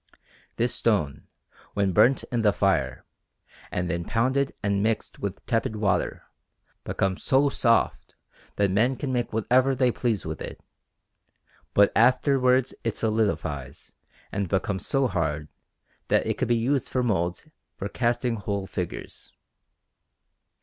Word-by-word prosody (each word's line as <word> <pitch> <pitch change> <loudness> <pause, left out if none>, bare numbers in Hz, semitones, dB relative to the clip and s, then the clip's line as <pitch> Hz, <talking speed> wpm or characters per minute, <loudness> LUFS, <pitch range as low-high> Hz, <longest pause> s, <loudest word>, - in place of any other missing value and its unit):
This 120 +1 +1
stone, 95 -12 0 0.5
when 100 -2 +2
burnt 125 +9 +4
in 120 -2 +1
the 105 -2 +4
fire, 95 -11 0 0.6
and 90 0 -2
then 85 -1 -2
pounded 130 +7 +1
and 100 -1 +1
mixed 110 +1 -1
with 100 -1 -5
tepid 115 -1 0
water, 105 -2 0 0.6
becomes 95 -1 -1
so 140 +2 +3
soft 115 -4 +1 0.4
that 100 -2 +2
men 120 +7 +2
can 130 0 -3
make 120 -1 -1
whatever 125 +5 +2
they 125 -1 +3
please 115 -4 -1
with - - -5
it; - - -7 1.2
but 100 0 +6
afterwards 130 +2 +3
it 115 - -1
solidifies 110 -2 -2 0.4
and 100 -2 -2
becomes 95 0 -1
so 135 -1 +2
hard, 80 - -1 0.6
that - - +2
it - - -2
can - - +1
be 120 - +3
used 130 +4 0
for 125 - 0
moulds 90 -6 -1 0.3
for 100 - -4
casting 120 +2 0
whole 100 -1 -3
figures. 90 -2 -6
110 Hz, 135 wpm, -26 LUFS, 100-125 Hz, 1.2 s, but